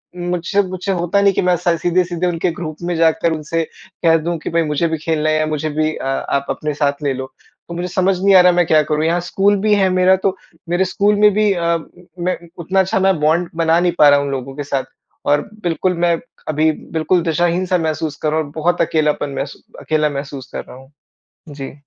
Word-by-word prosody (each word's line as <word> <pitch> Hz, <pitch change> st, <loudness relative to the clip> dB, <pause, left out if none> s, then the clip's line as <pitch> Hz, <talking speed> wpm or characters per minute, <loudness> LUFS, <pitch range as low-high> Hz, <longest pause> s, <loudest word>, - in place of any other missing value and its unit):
मुझसे 175 Hz, +2 st, 0 dB
मुझसे 185 Hz, +1 st, -4 dB
होता 180 Hz, +2 st, +1 dB
नहीं 200 Hz, -1 st, +4 dB
कि -, -, 0 dB
मैं 180 Hz, -1 st, +2 dB
सा 170 Hz, 0 st, +1 dB
सीधे-सीधे 175 Hz, +1 st, 0 dB
उनके 175 Hz, 0 st, 0 dB
ग्रुप 155 Hz, -2 st, -6 dB
में 175 Hz, 0 st, -1 dB
जाकर 165 Hz, 0 st, +2 dB
उनसे 160 Hz, +1 st, -2 dB, 0.4 s
कह 165 Hz, 0 st, +6 dB
दूँ, 170 Hz, +2 st, -2 dB
कि -, -, -5 dB
भाई 165 Hz, 0 st, +1 dB
मुझे 150 Hz, +2 st, 0 dB
भी 160 Hz, 0 st, -2 dB
खेलना 155 Hz, 0 st, -1 dB
है 155 Hz, -, +2 dB
या 155 Hz, -, +1 dB
मुझे 155 Hz, 0 st, -2 dB
भी 155 Hz, +1 st, 0 dB
अ, -, -, -6 dB
आप 135 Hz, +1 st, -1 dB
अपने 150 Hz, 0 st, -2 dB
साथ 145 Hz, 0 st, -1 dB
ले 140 Hz, -2 st, +1 dB
लो। 130 Hz, 0 st, -7 dB, 0.3 s
तो 170 Hz, -, -7 dB
मुझे 175 Hz, +1 st, -3 dB
समझ 185 Hz, +1 st, +1 dB
नहीं 195 Hz, 0 st, +4 dB
आ 185 Hz, -, +9 dB
रहा, 180 Hz, 0 st, +6 dB
मैं 175 Hz, 0 st, +2 dB
क्या 155 Hz, -1 st, +5 dB
करूँ? 150 Hz, +1 st, -1 dB
यहाँ 170 Hz, +2 st, +2 dB
स्कूल 195 Hz, +3 st, +2 dB
भी 215 Hz, 0 st, +3 dB
है 195 Hz, -2 st, +3 dB
मेरा 185 Hz, +1 st, +4 dB
तो 195 Hz, -1 st, +1 dB, 0.3 s
मेरे 175 Hz, +2 st, +2 dB
स्कूल 200 Hz, +3 st, +1 dB
में 210 Hz, 0 st, +7 dB
भी 210 Hz, 0 st, +2 dB
अ, 170 Hz, -2 st, 0 dB, 0.4 s
मैं 180 Hz, +1 st, -1 dB, 0.2 s
उतना 185 Hz, +3 st, 0 dB
अच्छा 190 Hz, 0 st, +1 dB
ना 190 Hz, 0 st, +3 dB
बॉन्ड 170 Hz, +3 st, +2 dB
बना 165 Hz, 0 st, +3 dB
नहीं 175 Hz, 0 st, +2 dB
पा 150 Hz, -, +8 dB
रहा 145 Hz, 0 st, +5 dB
उन 140 Hz, 0 st, -2 dB
लोगों 135 Hz, 0 st, -5 dB
के 145 Hz, -, -4 dB
साथ। 135 Hz, -1 st, -2 dB, 0.4 s
और 145 Hz, 0 st, +3 dB, 0.2 s
बिल्कुल 175 Hz, +1 st, 0 dB
मैं 170 Hz, -1 st, +3 dB, 0.3 s
अभी 155 Hz, +1 st, +2 dB, 0.2 s
बिल्कुल 165 Hz, +3 st, +1 dB
दिशाहीन 175 Hz, +2 st, +1 dB
सा 185 Hz, 0 st, +1 dB
महसूस 155 Hz, -2 st, -2 dB
कर 155 Hz, -, +2 dB
रहा 155 Hz, -, +1 dB
हूँ 155 Hz, -, -1 dB
और -, -, -13 dB
बहुत 175 Hz, +2 st, +1 dB
अकेलापन 150 Hz, -3 st, 0 dB
महसू 140 Hz, +1 st, -5 dB, 0.2 s
अकेला 155 Hz, -1 st, +1 dB
महसूस 140 Hz, -2 st, -7 dB
कर -, -, -4 dB
रहा -, -, -12 dB
हूँ। 135 Hz, +1 st, -16 dB, 0.6 s
जी। 140 Hz, -2 st, -7 dB
165 Hz, 230 wpm, -18 LUFS, 155-180 Hz, 0.6 s, आ